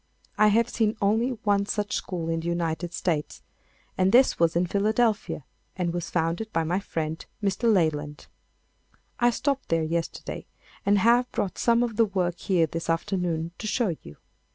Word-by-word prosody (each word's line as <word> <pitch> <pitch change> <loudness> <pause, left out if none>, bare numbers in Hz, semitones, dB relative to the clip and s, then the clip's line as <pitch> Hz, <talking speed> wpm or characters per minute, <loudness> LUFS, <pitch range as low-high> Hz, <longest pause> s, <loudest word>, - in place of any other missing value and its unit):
I 215 - +5
have 225 +2 +3
seen 220 -2 0
only 220 +5 +2
one 200 -1 +2
such 210 -1 -2
school 170 -3 -3
in 165 0 0
the 165 - -5
United 170 0 -2
States, 165 -4 -2 0.5
and 185 +1 +2
this 255 +3 +5
was 165 0 +3
in 175 +1 +3
Philadelphia 210 - 0 0.3
and 175 -2 -1
was 175 -1 -3
founded 170 +6 -1
by 165 - +1
my 175 +4 0
friend 160 -4 -4 0.2
Mr. 205 +4 +2
Leyland. 150 -6 0 0.9
I 240 0 +5
stopped 275 +2 -1
there 165 -1 +2
yesterday 165 +1 -4 0.4
and 205 +1 +5
have 240 +4 +3
brought 195 - -2
some 235 0 +3
of 230 -3 -3
the 230 - +5
work 180 -4 -1
here 180 -4 +2
this 165 +1 -5
afternoon 170 -1 -1
to 215 - -4
show 210 -6 0
you. 75 - -12
185 Hz, 170 wpm, -26 LUFS, 165-215 Hz, 0.9 s, I